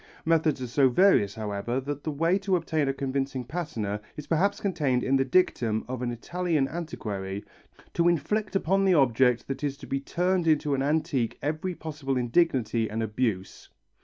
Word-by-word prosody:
Methods 160 -3 +2
are - - -3
so 130 +2 +3
various, 120 - +4
however, 110 +3 -2
that 140 +1 -5
the - - -2
way 165 +6 +1
to 195 -1 +1
obtain 160 -4 0
a - - +2
convincing 135 -1 -2
patina 115 - -4 0.2
is 150 - -6
perhaps 180 +5 +1
contained 150 -10 0
in 135 - +2
the 135 - +3
dictum 125 -8 +1
of 125 -1 -4
an 125 - -1
Italian 160 +4 -1
antiquary: 100 - -5 0.5
"To 170 0 +2
inflict 190 +6 0
upon 195 +1 +2
the 185 -2 +4
object 125 -3 +3
that 135 +1 -5
is 140 -1 -1
to - - -10
be 135 - -2
turned 175 +4 0
into 150 -2 +2
an 135 - 0
antique 140 -5 0
every 155 +5 -2
possible 150 -5 -3
indignity 120 -4 +1
and 110 +1 -2
abuse." 105 -3 -2
140 Hz, 175 wpm, -27 LUFS, 120-165 Hz, 0.5 s, various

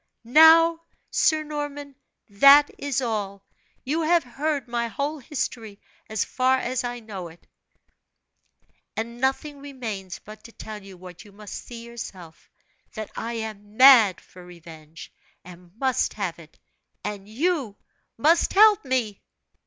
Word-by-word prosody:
"Now, 325 +6 +6 0.3
Sir 310 -1 +2
Norman, 290 -2 -6 0.3
that 275 +8 +6
is 275 -2 -2
all 200 -4 -4 0.4
you 305 +5 -1
have 335 +1 +2
heard 280 +1 -3
my 235 0 -2
whole 280 +7 -4
history 230 -6 -5 0.3
as 215 -2 -1
far 260 0 +1
as 255 0 -2
I 245 0 -4
know 200 -5 -8
it; 165 +1 -17 1.5
and 235 +2 -5
nothing 280 +2 -1
remains 230 -10 -7
but 215 0 -14
to 230 - -12
tell 215 -1 -9
you 195 -1 -13
what 180 -1 -12
you 205 - -17
must 205 +1 -11
see 235 -1 -9
yourself, 190 -8 -10 0.5
that 215 -2 -6
I 230 +1 -4
am 215 -2 -7
mad 245 -8 +7
for 180 - -16
revenge, 165 -2 -13 0.3
and 180 -1 -14
must 260 0 0
have 190 -5 -4
it, 160 -1 -17 0.5
and 205 -1 -6
you 270 - -1 0.4
must 320 +8 +3
help 420 0 +6
me!" 250 -7 -2
235 Hz, 135 wpm, -24 LUFS, 200-280 Hz, 1.5 s, mad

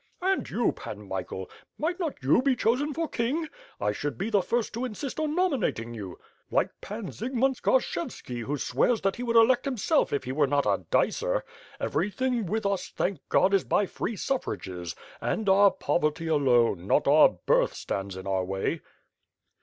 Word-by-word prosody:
"And 380 +1 +1
you, - - +1
Pan - - -9
Michael, - - -4 0.3
might 345 +4 -1
not 320 - -3
you 140 - +4
be 265 -1 +2
chosen 250 +6 +1
for 325 +3 -2
king? 285 +8 -1 0.3
I 105 0 +1
should 130 +4 -4
be 220 - -3
the 205 -3 +4
first 235 +4 -1
to 235 +3 -3
insist 255 +4 -4
on 310 -1 -1
nominating 260 - 0
you; 100 -6 -7 0.3
like - - +1
Pan 210 -1 -6
Zygmunt 260 +2 0
Skarshevski 255 - -1
who 140 +6 -2
swears 230 - +1
that 195 0 0
he - - -5
would 235 -1 -1
elect 240 +3 +5
himself 275 +4 +1
if 140 - -1
he 130 - -4
were 145 +1 +2
not 140 +1 +1
a - - 0
dicer. - - +1 0.4
Everything 235 +1 -1
with 220 +4 -1
us 200 -1 -1
thank 190 -5 -2
God 190 +2 +4
is 195 - +4
by 205 - +2
free 220 +4 -4
suffrages; 95 - -3 0.3
and 220 - -1
our 200 +1 +7
poverty, 155 -3 -1
alone, 120 - +2
not - - +3
our - - +7 0.2
birth, - - +3
stands 95 -1 -4
in 95 - -8
our 95 -1 0
way." 95 +1 -2
205 Hz, 175 wpm, -27 LUFS, -, 0.4 s, our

